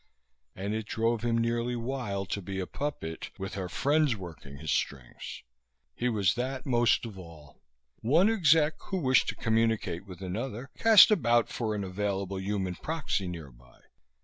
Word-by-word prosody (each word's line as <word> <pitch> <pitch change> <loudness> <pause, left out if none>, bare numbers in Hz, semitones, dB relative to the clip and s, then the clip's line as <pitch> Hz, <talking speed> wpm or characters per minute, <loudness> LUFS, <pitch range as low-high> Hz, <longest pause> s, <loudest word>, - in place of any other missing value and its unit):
And 100 +3 -3
it 110 -1 -3
drove 115 0 0
him 115 -1 +1
nearly 115 +1 0
wild 115 -6 -3
to 100 - -2
be 95 +1 -5
a 95 - -2
puppet 110 - -5
with 95 0 -5
her 95 -2 -4
friends 145 - +2
working 80 -7 -10
his 75 +1 -3
strings. 65 -4 -3 0.5
He 125 - -1
was 100 -6 +2
that 130 +3 -3
most 120 -2 +3
of 105 -4 -8
all. 80 -5 -13 0.4
One 160 - +4
exec 160 -7 +3
who 190 - -2
wished 130 -8 +3
to - - -3
communicate 110 -5 0
with 90 -1 -10
another 115 +7 -4
cast 220 -4 +8
about 120 - +3
for 110 -3 -2
an 100 - -2
available 95 0 -2
human 95 -1 -2
proxy 155 - -2
nearby. 65 -8 -10
110 Hz, 160 wpm, -29 LUFS, 95-125 Hz, 0.5 s, cast